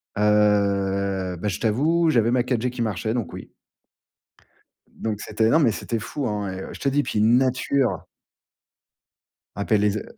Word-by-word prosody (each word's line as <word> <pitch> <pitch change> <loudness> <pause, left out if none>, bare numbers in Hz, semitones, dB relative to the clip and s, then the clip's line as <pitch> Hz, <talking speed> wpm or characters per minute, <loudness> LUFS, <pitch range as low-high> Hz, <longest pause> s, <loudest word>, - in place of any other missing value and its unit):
Heu, 100 -2 +1
bah, 105 - -4
je 95 - -4
t'avoue, 155 +10 +2
j'avais 115 -5 +3
ma 125 0 +3
4G 125 -1 -1
qui 125 - -5
marchait 110 0 -2
donc 120 -3 -3
oui. - - -9 1.4
Donc 110 -2 -4
c'était 110 0 0
non 160 - +4
mais 130 -8 +3
c'était 115 +2 -3
fou, 130 +5 -4
hein 105 -3 -3
et 95 - -6
heu, - - -8
je - - -10
te 140 - 0
dis 145 +1 +1
puis 105 - -2
une 115 +3 +5
nature! 130 0 0 1.5
Appelle 100 +1 +1
les 105 0 +3
z 110 - -4
110 Hz, 170 wpm, -23 LUFS, 100-125 Hz, 1.5 s, une